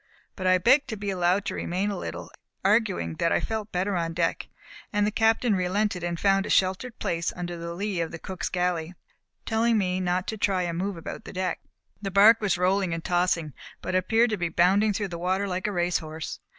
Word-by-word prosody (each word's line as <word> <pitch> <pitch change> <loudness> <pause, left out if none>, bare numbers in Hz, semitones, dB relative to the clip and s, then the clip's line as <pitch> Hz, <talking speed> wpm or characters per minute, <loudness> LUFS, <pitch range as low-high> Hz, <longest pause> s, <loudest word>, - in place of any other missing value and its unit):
But 185 -2 -2
I 185 0 +5
begged 260 +9 +4
to 225 - -4
be 200 0 -3
allowed 185 +2 +1
to - - -2
remain 190 +4 -2
a - - -3
little, - - -6 0.3
arguing 195 - +1
that 170 - +1
I - - +3
felt 220 -1 -4
better 190 +2 -1
on 165 -1 -2
deck, 170 -1 0 0.4
and 205 -1 +2
the 210 - 0
Captain 225 +1 +2
relented 185 +1 0
and 170 -1 -2
found 195 0 +2
a - - -7
sheltered 190 +6 +1
place 170 0 -1
under 175 -1 -4
the 170 0 -6
lee 195 -1 -2
of 165 - -2
the 165 - -7
cook's 185 +2 -5
galley, 180 -1 -1 0.5
telling 225 0 +2
me 185 -2 0
not 180 0 0
to 220 - -3
try 190 -3 +1
to 170 - -2
move 190 +2 -2
about 165 - -7
the - - -9
deck. 185 -2 -2 0.4
The 195 - -3
bark 210 +4 +6
was 200 -5 +1
rolling 185 -1 +1
and 165 - -6
tossing, 175 -4 +1 0.3
but - - -4
appeared 225 +6 +3
to 215 - 0
be 175 -2 -1
bounding 195 +6 +3
through 205 0 -2
the 170 -1 -6
water 190 +3 0
like 185 +1 -2
a - - -1
race 175 -2 +1
horse. 155 0 -6
185 Hz, 220 wpm, -26 LUFS, 175-205 Hz, 0.5 s, bark